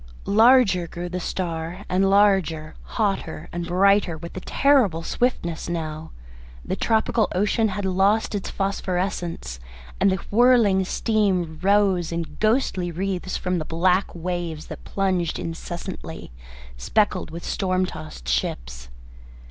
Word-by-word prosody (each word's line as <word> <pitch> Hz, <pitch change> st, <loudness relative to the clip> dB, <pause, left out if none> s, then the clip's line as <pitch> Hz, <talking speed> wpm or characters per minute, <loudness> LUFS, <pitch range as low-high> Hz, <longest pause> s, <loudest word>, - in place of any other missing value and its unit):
Larger 215 Hz, -5 st, +5 dB
grew 175 Hz, +1 st, -6 dB
the 180 Hz, +1 st, -3 dB
star, 175 Hz, +1 st, -4 dB
and 190 Hz, +1 st, +2 dB
larger, 190 Hz, -6 st, +3 dB, 0.2 s
hotter, 195 Hz, -7 st, -1 dB
and 175 Hz, 0 st, -4 dB
brighter 190 Hz, -1 st, +3 dB
with 170 Hz, +2 st, -9 dB
a -, -, -3 dB
terrible 225 Hz, -, +2 dB
swiftness 175 Hz, -8 st, -1 dB
now. 160 Hz, -2 st, -4 dB, 0.6 s
The -, -, -2 dB
tropical 220 Hz, -1 st, +1 dB
ocean 210 Hz, +4 st, +2 dB
had 200 Hz, 0 st, -3 dB
lost 195 Hz, +4 st, +2 dB
its 200 Hz, -2 st, -3 dB
phosphorescence, 180 Hz, -, -3 dB, 0.4 s
and 195 Hz, 0 st, +4 dB
the -, -, +2 dB, 0.2 s
whirling 220 Hz, -4 st, +4 dB
steam 185 Hz, -7 st, 0 dB
rose 195 Hz, -3 st, +2 dB
in 170 Hz, -1 st, -4 dB
ghostly 215 Hz, -5 st, +1 dB
wreaths 185 Hz, +1 st, -3 dB
from 180 Hz, -1 st, -1 dB
the -, -, -2 dB
black 180 Hz, +4 st, +2 dB
waves 170 Hz, -2 st, -4 dB
that -, -, -8 dB
plunged 185 Hz, -4 st, 0 dB
incessantly, 170 Hz, -, -6 dB, 0.5 s
speckled 185 Hz, -, 0 dB
with 170 Hz, +2 st, -8 dB
storm 185 Hz, -1 st, 0 dB
tossed 155 Hz, -, -9 dB
ships. -, -, -2 dB
185 Hz, 125 wpm, -23 LUFS, 165-200 Hz, 0.6 s, Larger